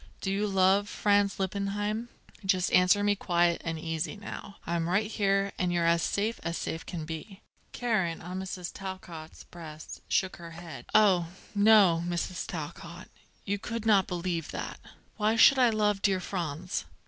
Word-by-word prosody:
Do 195 Hz, -, -2 dB
you 205 Hz, +2 st, 0 dB
love 195 Hz, +1 st, +3 dB
Franz 205 Hz, -1 st, +2 dB
Lippheim? 205 Hz, +4 st, -2 dB, 0.3 s
Just 185 Hz, -2 st, +1 dB
answer 180 Hz, +3 st, +5 dB
me 205 Hz, 0 st, +3 dB
quiet 175 Hz, -3 st, +1 dB
and 165 Hz, -1 st, -3 dB
easy 160 Hz, +2 st, -3 dB
now. 205 Hz, 0 st, -8 dB
I'm 170 Hz, 0 st, -1 dB
right 200 Hz, +4 st, +2 dB
here, 195 Hz, -2 st, +1 dB
and 180 Hz, -1 st, +1 dB
you're 170 Hz, -1 st, +1 dB
as 170 Hz, 0 st, +3 dB
safe 215 Hz, +7 st, -1 dB
as 170 Hz, 0 st, -3 dB
safe 160 Hz, -, -4 dB
can 165 Hz, -3 st, -5 dB
be." 170 Hz, +6 st, -7 dB, 0.3 s
Karen, 215 Hz, -9 st, 0 dB
on 180 Hz, +2 st, -6 dB
Mrs. 185 Hz, -2 st, -5 dB
Talcott's 180 Hz, -5 st, -8 dB
breast, 155 Hz, -3 st, -10 dB
shook 190 Hz, -1 st, 0 dB
her 170 Hz, -1 st, -10 dB
head. 170 Hz, -2 st, -9 dB
"Oh, 190 Hz, -6 st, +5 dB, 0.3 s
no, 200 Hz, -5 st, +5 dB
Mrs. 175 Hz, +1 st, -3 dB
Talcott; -, -, -7 dB, 0.4 s
you 200 Hz, 0 st, -1 dB
could 230 Hz, +1 st, -5 dB
not 200 Hz, -4 st, +4 dB
believe 175 Hz, -2 st, -3 dB
that. -, -, -5 dB, 0.4 s
Why 215 Hz, +1 st, +2 dB
should 265 Hz, +4 st, +7 dB
I 250 Hz, -2 st, +6 dB
love 210 Hz, -2 st, +1 dB
dear 195 Hz, -2 st, +2 dB
Franz?" 175 Hz, -1 st, -3 dB
190 Hz, 160 wpm, -29 LUFS, 170-205 Hz, 0.4 s, should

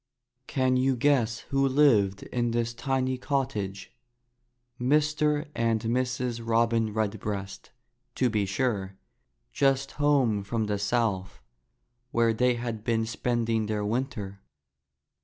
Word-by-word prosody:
Can 130 Hz, -1 st, +1 dB
you 130 Hz, +1 st, +2 dB
guess 120 Hz, -3 st, +2 dB
who 135 Hz, 0 st, +3 dB
lived 115 Hz, -9 st, +3 dB
in 120 Hz, -1 st, -1 dB
this 115 Hz, 0 st, -1 dB
tiny 130 Hz, +1 st, -1 dB
cot 135 Hz, -1 st, 0 dB
tage? 100 Hz, -4 st, -5 dB, 0.9 s
Mr. 150 Hz, +3 st, +2 dB
and 115 Hz, -1 st, +1 dB
Mrs. 125 Hz, 0 st, -1 dB
Robin 115 Hz, -1 st, +2 dB
Redbreast, 105 Hz, -2 st, -3 dB, 0.5 s
to 130 Hz, -, +2 dB
be 105 Hz, -4 st, 0 dB
sure, 100 Hz, -3 st, -1 dB, 0.6 s
just 135 Hz, -1 st, +2 dB
home 130 Hz, -9 st, +3 dB
from 110 Hz, +2 st, -1 dB
the 105 Hz, -1 st, -2 dB
south, 100 Hz, -3 st, -1 dB, 0.7 s
where 115 Hz, -2 st, +2 dB
they 125 Hz, +2 st, +2 dB
had 115 Hz, -3 st, -4 dB
been 115 Hz, -1 st, +1 dB
spending 115 Hz, -1 st, -1 dB
their 105 Hz, -1 st, -1 dB
winter. 105 Hz, -4 st, -3 dB
115 Hz, 120 wpm, -27 LUFS, 110-130 Hz, 0.9 s, who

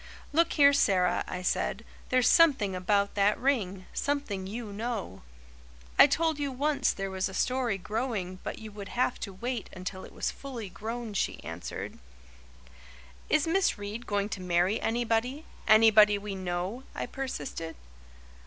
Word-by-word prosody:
"Look 335 Hz, +3 st, +3 dB
here, 285 Hz, -2 st, +6 dB
Sara," 185 Hz, -9 st, +3 dB
I 180 Hz, -, -5 dB
said, -, -, -1 dB, 0.2 s
"there's 255 Hz, -2 st, +3 dB
something 270 Hz, -, +5 dB
about 200 Hz, +2 st, +1 dB
that 205 Hz, +1 st, +3 dB
ring 200 Hz, -9 st, 0 dB
something 250 Hz, -10 st, -2 dB
you 215 Hz, 0 st, -6 dB
know." 215 Hz, -, -4 dB, 0.8 s
"I -, -, +11 dB
told 320 Hz, -2 st, +1 dB
you 285 Hz, -1 st, -1 dB
once 285 Hz, +3 st, +1 dB
there 195 Hz, -1 st, -4 dB
was 190 Hz, 0 st, -1 dB
a 190 Hz, -, -8 dB
story 250 Hz, -5 st, 0 dB
growing 200 Hz, -2 st, -3 dB
but -, -, -5 dB
you 220 Hz, -1 st, -9 dB
would 200 Hz, -1 st, -8 dB
have 245 Hz, +2 st, 0 dB
to 200 Hz, -, -5 dB
wait 235 Hz, +4 st, -4 dB
until 185 Hz, 0 st, -6 dB
it -, -, -11 dB
was -, -, -2 dB
fully 245 Hz, -7 st, -7 dB
grown," 220 Hz, +4 st, -5 dB
she 200 Hz, -, -1 dB
answered. 80 Hz, +3 st, -6 dB, 1.3 s
"Is 305 Hz, -, +3 dB
Miss 345 Hz, -1 st, +2 dB
Reade 205 Hz, +4 st, -6 dB
going 205 Hz, 0 st, 0 dB
to 200 Hz, -, -5 dB
marry 180 Hz, +3 st, +1 dB
anybody 240 Hz, +5 st, 0 dB, 0.2 s
anybody 215 Hz, -1 st, +7 dB
we 200 Hz, 0 st, -5 dB
know?" 185 Hz, +5 st, -3 dB
I -, -, -2 dB
persisted. 165 Hz, -, -5 dB
215 Hz, 155 wpm, -29 LUFS, 190-255 Hz, 1.3 s, I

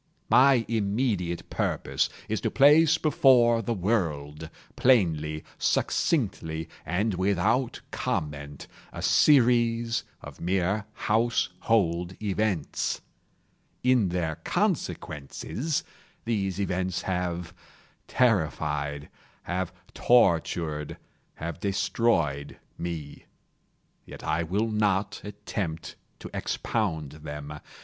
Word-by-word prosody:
My 130 Hz, -3 st, +6 dB
immediate 100 Hz, -5 st, -1 dB
purpose -, -, 0 dB, 0.2 s
is -, -, -2 dB
to -, -, 0 dB
place 150 Hz, +3 st, +6 dB
before 125 Hz, -6 st, +4 dB
the 115 Hz, +1 st, -2 dB
world, 80 Hz, -7 st, -1 dB, 0.3 s
plainly, 80 Hz, -, +2 dB, 0.2 s
succinctly, 90 Hz, -, 0 dB, 0.2 s
and 100 Hz, +6 st, 0 dB
without 100 Hz, +7 st, +1 dB
comment, 70 Hz, -2 st, -3 dB, 0.3 s
a -, -, -7 dB
series 120 Hz, -4 st, +4 dB, 0.2 s
of -, -, -10 dB
mere 95 Hz, +4 st, 0 dB, 0.2 s
household 105 Hz, -5 st, +1 dB
events. 100 Hz, -5 st, -1 dB, 0.8 s
In 125 Hz, -6 st, +3 dB
their 85 Hz, -3 st, -2 dB
consequences, 110 Hz, -, -2 dB, 0.4 s
these 100 Hz, -5 st, -1 dB
events 95 Hz, -2 st, -1 dB
have 90 Hz, -2 st, -2 dB, 0.5 s
terrified—have 80 Hz, -, -1 dB, 0.2 s
tortured—have 85 Hz, -6 st, 0 dB
destroyed 85 Hz, -8 st, 0 dB, 0.2 s
me. 80 Hz, -4 st, -6 dB, 0.8 s
Yet -, -, -10 dB
I 80 Hz, +1 st, 0 dB
will 100 Hz, +7 st, -1 dB
not 105 Hz, -2 st, 0 dB
attempt 100 Hz, -5 st, -5 dB, 0.2 s
to -, -, -10 dB
expound 80 Hz, -10 st, -2 dB
them. 75 Hz, 0 st, -7 dB
95 Hz, 80 wpm, -27 LUFS, 80-115 Hz, 0.8 s, My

